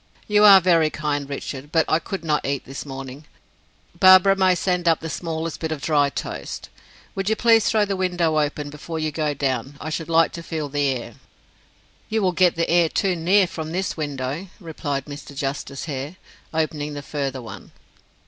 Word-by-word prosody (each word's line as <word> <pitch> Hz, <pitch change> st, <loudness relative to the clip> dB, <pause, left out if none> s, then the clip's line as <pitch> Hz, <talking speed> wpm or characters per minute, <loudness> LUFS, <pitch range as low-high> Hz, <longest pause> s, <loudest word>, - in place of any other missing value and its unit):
"You 210 Hz, 0 st, +4 dB
are 200 Hz, -2 st, +10 dB
very 165 Hz, -4 st, +3 dB
kind, 145 Hz, -2 st, -3 dB
Richard, 140 Hz, 0 st, -6 dB
but 165 Hz, -1 st, +3 dB
I 155 Hz, -, +2 dB
could 185 Hz, -1 st, -6 dB
not 150 Hz, -2 st, +1 dB
eat 140 Hz, 0 st, -2 dB
it -, -, -31 dB
this 135 Hz, +2 st, -7 dB
morning. 135 Hz, +2 st, -8 dB, 0.7 s
Barbara 185 Hz, +1 st, +7 dB
may 190 Hz, -1 st, +3 dB
send 180 Hz, -1 st, -1 dB
up 165 Hz, -1 st, +4 dB
the 160 Hz, -1 st, -6 dB
smallest 165 Hz, +2 st, -4 dB
bit 160 Hz, -1 st, -3 dB
of 155 Hz, -, -3 dB
dry 145 Hz, -1 st, +2 dB
toast. -, -, -6 dB, 0.4 s
Would 195 Hz, +1 st, -2 dB
you 220 Hz, -, +2 dB
please 225 Hz, -1 st, +4 dB
throw 215 Hz, -2 st, +3 dB
the 200 Hz, -1 st, -2 dB
window 175 Hz, -4 st, +1 dB
open 145 Hz, 0 st, -2 dB
before 155 Hz, +2 st, -6 dB
you 155 Hz, -1 st, -1 dB
go 150 Hz, -1 st, -1 dB
down; 135 Hz, 0 st, -2 dB
I 155 Hz, -, -5 dB
should 165 Hz, +1 st, -4 dB
like 165 Hz, -1 st, +4 dB
to 170 Hz, -, -7 dB
feel 155 Hz, -3 st, -4 dB
the 145 Hz, 0 st, 0 dB
air." 130 Hz, -3 st, -3 dB, 1.0 s
"You 220 Hz, -1 st, 0 dB
will 185 Hz, -, +3 dB
get 180 Hz, -1 st, +3 dB
the 165 Hz, 0 st, 0 dB
air 170 Hz, -1 st, +3 dB
too 190 Hz, 0 st, 0 dB
near 185 Hz, +4 st, +3 dB
from 160 Hz, -2 st, -6 dB
this 190 Hz, +2 st, -2 dB
window," 145 Hz, +3 st, -4 dB
replied 150 Hz, -6 st, -4 dB
Mr. 145 Hz, -1 st, -9 dB
Justice 140 Hz, 0 st, -4 dB
Hare, 145 Hz, +2 st, -5 dB, 0.4 s
opening 150 Hz, -2 st, -2 dB
the 145 Hz, -, -6 dB
further 135 Hz, -2 st, -3 dB
one. 105 Hz, -5 st, -10 dB
155 Hz, 195 wpm, -22 LUFS, 145-180 Hz, 1.0 s, are